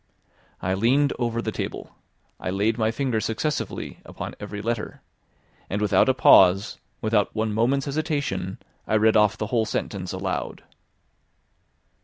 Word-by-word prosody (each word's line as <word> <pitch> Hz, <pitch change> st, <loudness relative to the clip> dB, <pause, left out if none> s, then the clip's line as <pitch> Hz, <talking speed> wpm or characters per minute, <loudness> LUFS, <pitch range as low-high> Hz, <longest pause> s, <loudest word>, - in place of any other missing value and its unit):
I 95 Hz, -, 0 dB
leaned 130 Hz, +8 st, +2 dB
over 115 Hz, -1 st, -1 dB
the -, -, -2 dB
table; -, -, -5 dB, 0.5 s
I -, -, -4 dB
laid 100 Hz, +4 st, +1 dB
my 110 Hz, -1 st, +1 dB
finger 115 Hz, -1 st, -1 dB
successively 140 Hz, +8 st, -3 dB
upon -, -, -7 dB
every 105 Hz, -, -6 dB
letter; 115 Hz, +1 st, -4 dB, 0.7 s
and 100 Hz, -, -1 dB
without 105 Hz, +5 st, +3 dB
a 130 Hz, -, +3 dB
pause, 95 Hz, -4 st, +5 dB, 0.2 s
without 110 Hz, -2 st, +1 dB
one 110 Hz, -1 st, -1 dB
moment's 125 Hz, +6 st, +1 dB
hesitation, 140 Hz, -, -2 dB, 0.3 s
I -, -, +1 dB
read 110 Hz, +1 st, +4 dB
off 105 Hz, 0 st, +4 dB
the 105 Hz, -, -2 dB
whole 110 Hz, -2 st, +2 dB
sentence 95 Hz, -3 st, -3 dB
aloud. 95 Hz, 0 st, -4 dB
110 Hz, 140 wpm, -24 LUFS, 100-120 Hz, 0.7 s, pause